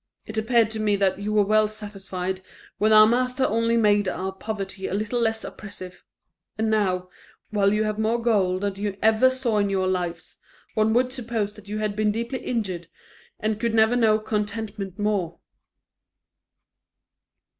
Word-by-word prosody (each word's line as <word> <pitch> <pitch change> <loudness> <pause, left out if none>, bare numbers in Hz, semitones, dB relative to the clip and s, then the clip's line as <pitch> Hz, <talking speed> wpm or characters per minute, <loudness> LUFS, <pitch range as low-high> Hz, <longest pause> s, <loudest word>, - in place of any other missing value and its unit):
It 215 - -8
appeared 225 0 +2
to 220 - -4
me 210 -1 +2
that 195 -1 +1
you 205 +1 -3
were 210 -1 +3
well 215 +1 +4
satisfied 195 -3 -5 0.4
when 215 +1 +3
our 215 0 +9
master 250 +3 +1
only 230 +1 +1
made 205 -2 +3
our 185 +1 -2
poverty 195 -1 -5
a - - -2
little 215 +4 -1
less 225 -1 0
oppressive; 185 -3 -9 0.5
and 220 0 0
now, 185 -4 0 0.4
while 200 -2 +3
you 210 +1 +2
have 215 0 -2
more 225 +2 +1
gold 195 -6 +1
than 200 -1 -1
you 200 -1 -3
ever 220 +4 +5
saw 255 -5 0
in 200 -1 +1
your 190 -1 0
lives, 175 -2 -3 0.3
one 220 +1 +2
would 250 +1 +2
suppose 225 -5 -3
that 210 -1 -15
you 210 +1 -4
had 215 -1 -2
been 210 0 +2
deeply 235 +4 -3
injured, 190 -8 -3 0.5
and 215 0 -1
could 230 0 0
never 220 +2 +4
know 220 -3 +4
contentment 210 -2 -4
more." 200 -5 -1
215 Hz, 165 wpm, -24 LUFS, 195-220 Hz, 0.5 s, our